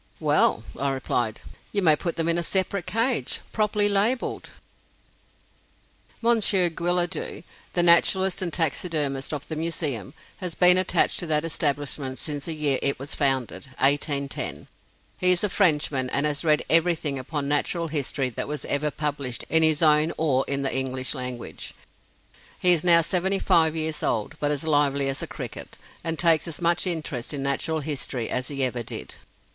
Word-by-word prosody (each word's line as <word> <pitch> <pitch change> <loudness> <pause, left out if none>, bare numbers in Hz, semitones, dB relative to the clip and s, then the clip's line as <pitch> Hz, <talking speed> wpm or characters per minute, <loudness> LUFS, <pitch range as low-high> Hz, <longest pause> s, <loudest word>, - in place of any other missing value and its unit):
"Well," 150 -7 +2 0.2
I 140 - 0
replied, 120 -4 -2 0.3
"you 200 -2 -1
may 155 -3 +5
put 170 +2 -4
them 165 -1 -2
in 170 +1 +2
a - - 0
separate 190 +1 -1
cage, 230 +3 -1
properly 210 -1 +1
labeled." 205 +5 0 1.7
Monsieur 205 -6 +3
Guillaudeu, 175 0 -2 0.3
the 175 - +1
naturalist 185 +3 +4
and 180 -2 -2
taxidermist 150 -4 -1
of 145 -2 -5
the 160 - -5
Museum, 155 - -3 0.2
has 180 -5 -5
been 180 0 +6
attached 185 - +1
to 175 - -1
that 155 0 +1
establishment 145 -4 -1
since 145 -2 -6
the 165 - -3
year 145 -3 +1
it 140 - +2
was 135 +2 -5
founded, 135 -2 -1
1810. 140 0 0 0.5
He 180 0 +5
is 175 - -2
a 210 - +1
Frenchman, 150 -9 +1
and 140 +3 +1
has 150 0 -1
read 155 -2 +2
everything 165 -4 +2
upon 140 +2 -4
Natural 165 +3 0
History 140 -3 -2
that - - -5
was 150 +1 -5
ever 150 +1 +1
published 140 -4 -4
in 160 - +5
his 160 0 +3
own 155 +1 +4
or 135 -5 +1
in 140 0 -1
the 135 - 0
English 130 -1 -1
language. 125 -3 -6 0.8
He 180 -1 +5
is 165 - 0
now 170 -1 +6
seventy 185 +3 +1
five 160 -4 +2
years 160 -1 -3
old, 110 -2 -2
but 145 - 0
is 145 0 -1
lively 145 -3 +2
as 135 - -3
a - - -4
cricket, - - -8 0.3
and 165 -1 -2
takes 165 0 +3
as 165 - -5
much 170 +1 +1
interest 150 -6 -3
in 135 - -4
Natural 150 +3 -1
History 135 -5 -4
as 130 0 -1
he 140 -2 -2
ever 125 -2 0
did. 115 - -6
155 Hz, 170 wpm, -24 LUFS, 140-170 Hz, 1.7 s, been